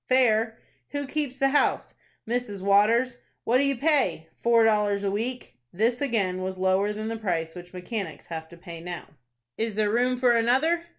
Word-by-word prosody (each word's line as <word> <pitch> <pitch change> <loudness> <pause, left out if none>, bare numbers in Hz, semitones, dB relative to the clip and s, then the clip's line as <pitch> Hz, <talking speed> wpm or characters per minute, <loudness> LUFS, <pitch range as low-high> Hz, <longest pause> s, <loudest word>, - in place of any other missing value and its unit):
"Fair." 225 -3 +3 0.4
"Who 285 0 -2
keeps 280 -2 -3
the 275 - +3
house?" 290 +1 +1 0.3
"Mrs. 225 -5 -2
Waters." 230 +5 +3 0.2
"What 245 +2 +3
do - - +3
you 275 0 +1
pay?" 235 - +1
"Four 235 -1 +4
dollars 210 -2 +2
a 200 - 0
week." 240 - -4
This 230 +7 0
again 200 -9 0
was 185 0 -4
lower 190 +2 +2
than 215 +1 -5
the 225 0 -3
price 170 -6 -2
which 180 0 -10
mechanics 180 -1 -6
have 160 -1 -7
to 170 - -13
pay 170 -1 -9
now. 175 0 -6 0.5
"Is 225 -2 -1
there 210 -1 +1
room 250 +2 +1
for 250 -1 +4
another?" 265 +9 +2
220 Hz, 180 wpm, -26 LUFS, 190-250 Hz, 0.5 s, Four